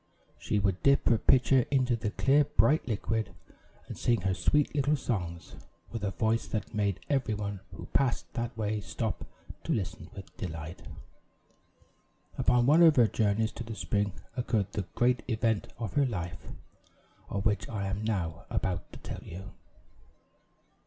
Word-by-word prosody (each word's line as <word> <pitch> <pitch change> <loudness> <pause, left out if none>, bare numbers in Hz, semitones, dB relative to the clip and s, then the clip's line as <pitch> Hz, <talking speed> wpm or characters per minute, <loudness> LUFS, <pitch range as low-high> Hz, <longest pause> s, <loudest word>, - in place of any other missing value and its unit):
She - - -1
would 100 -2 +1
dip 140 0 +4
her 115 -2 +4
pitcher 130 +1 +4
into 130 -3 +2
the 115 -2 -2
clear, 140 +7 +4
bright 145 +1 +3
liquid, 110 0 -2 0.5
and - - -6
sing 120 -4 +1
her 95 0 +1
sweet 145 +9 +2
little 145 +1 +2
songs, 90 - -3 0.4
with 115 -3 -5
a 100 - +1
voice 110 +3 0
that 110 0 -4
made 100 -3 0
every 135 -6 +1
one 100 -1 -4 0.2
who - - -8
passed 135 -4 +1
that 120 0 -3
way 105 -1 -1
stop - - -3 0.4
to - - -3
listen 90 -4 -2
with 95 -3 -10
delight. 80 -2 -6 1.5
Upon 125 -1 +3
one 150 +6 +6
of 165 -3 +8
her 120 - +6
journeys 110 0 +1
to 120 - -6
the 115 -1 -6
spring, 100 -2 0 0.2
occurred 110 -5 0
the 100 -3 -3
great 125 +1 +3
event 110 -2 0
of 115 -4 -4
her 140 -2 +3
life, 85 -7 -5 0.8
of 100 +1 -2
which 105 -1 +1
I 105 -3 -3
am 100 +2 -2
now 90 -9 -2
about 90 -2 -2
to - - -8
tell - - -7
you. 95 +4 -9
110 Hz, 160 wpm, -30 LUFS, 100-125 Hz, 1.5 s, of